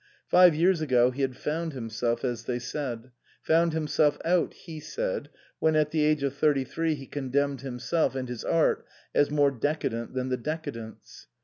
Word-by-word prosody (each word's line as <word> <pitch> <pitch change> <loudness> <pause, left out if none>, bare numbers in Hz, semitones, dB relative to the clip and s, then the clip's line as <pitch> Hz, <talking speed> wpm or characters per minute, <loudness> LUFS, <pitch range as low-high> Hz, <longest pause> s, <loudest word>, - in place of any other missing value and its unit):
Five 180 -3 +7
years 170 +1 +3
ago 125 -4 +3
he 135 +3 -5
had 130 -2 -1
found 160 +2 -2
himself, 115 -1 -2
as 120 -2 -3
they 125 - -1
said; 125 -1 -5 0.3
found 165 +1 +3
himself 150 -1 +2
out, 175 +1 +2
he 160 -3 -9
said, - - -3 0.3
when 160 0 +2
at 150 -1 +2
the 155 -1 +1
age 150 -1 +2
of 140 -1 0
thirty 145 -1 +2
three 165 +3 -1
he 135 -2 -9
condemned 140 0 -1
himself 135 +4 -1
and 130 -1 -3
his 120 -2 -6
art 165 -1 +2 0.3
as 145 - +3
more 145 -1 +3
decadent 130 -3 -2
than 130 0 -1
the 125 - 0
decadents. 115 -6 -7
145 Hz, 180 wpm, -27 LUFS, 125-160 Hz, 0.3 s, Five